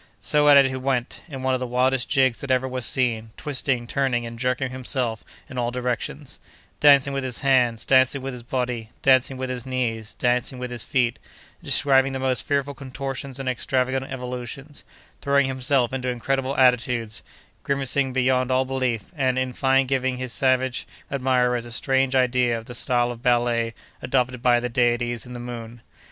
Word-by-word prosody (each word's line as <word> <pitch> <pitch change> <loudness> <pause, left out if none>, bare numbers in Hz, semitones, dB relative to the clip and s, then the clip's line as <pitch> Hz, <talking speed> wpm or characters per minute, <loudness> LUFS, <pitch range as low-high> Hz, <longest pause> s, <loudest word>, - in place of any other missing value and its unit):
So 150 0 +3
at 145 - +9
it 140 - +7
he 130 0 -2
went, 130 -2 -2
in 135 -3 -7
one 130 0 +1
of 130 - 0
the 125 - -3
wildest 125 +1 +1
jigs 130 -4 +2
that 140 - -6
ever 130 0 +2
was 130 -2 -3
seen, 115 -4 0
twisting, 135 -4 -1
turning, 125 -1 0
and 115 0 -8
jerking 125 +1 -1
himself 125 -3 -2 0.2
in 130 - -6
all 120 -1 0
directions; 125 -1 -4 0.4
dancing 140 -1 +5
with 135 -1 -2
his 125 -2 -4
hands, 125 -4 +2
dancing 130 +1 +4
with 135 0 -4
his 125 - -8
body, 120 -2 -3
dancing 130 0 +4
with 130 0 -3
his 125 -2 -5
knees, 120 -4 -3
dancing 125 +1 0
with 125 0 -5
his 120 -2 -2
feet; 120 0 0 0.4
describing 135 -1 +3
the - - -2
most 130 -1 0
fearful 140 0 -1
contortions 135 -1 -6
and 135 - -5
extravagant 130 +1 -1
evolutions; 125 +3 -6 0.4
throwing 140 0 +3
himself 130 -1 +1
into 130 -1 -2
incredible 135 +2 -1
attitudes; 125 -3 +2 0.4
grimacing 140 -1 +1
beyond 130 0 +1
all 130 0 +2
belief, 130 -5 -2
and, 130 -3 +1
in 130 -1 -1
fine 135 +1 +2
giving 130 -1 -1
his 130 -1 -4
savage 130 -1 +1 0.2
admirers 125 -3 +1
a - - -9
strange 135 +2 +1
idea 125 -2 +2
of 115 - -9
the 125 - -9
style 120 0 +1
of 120 -1 -9
ballet 120 -2 +1 0.3
adopted 125 -1 0
by 120 -1 +4
the 125 - -2
deities 120 0 0
in 125 - -9
the 120 - -7
moon. 120 -1 -7
130 Hz, 180 wpm, -23 LUFS, 120-135 Hz, 0.4 s, at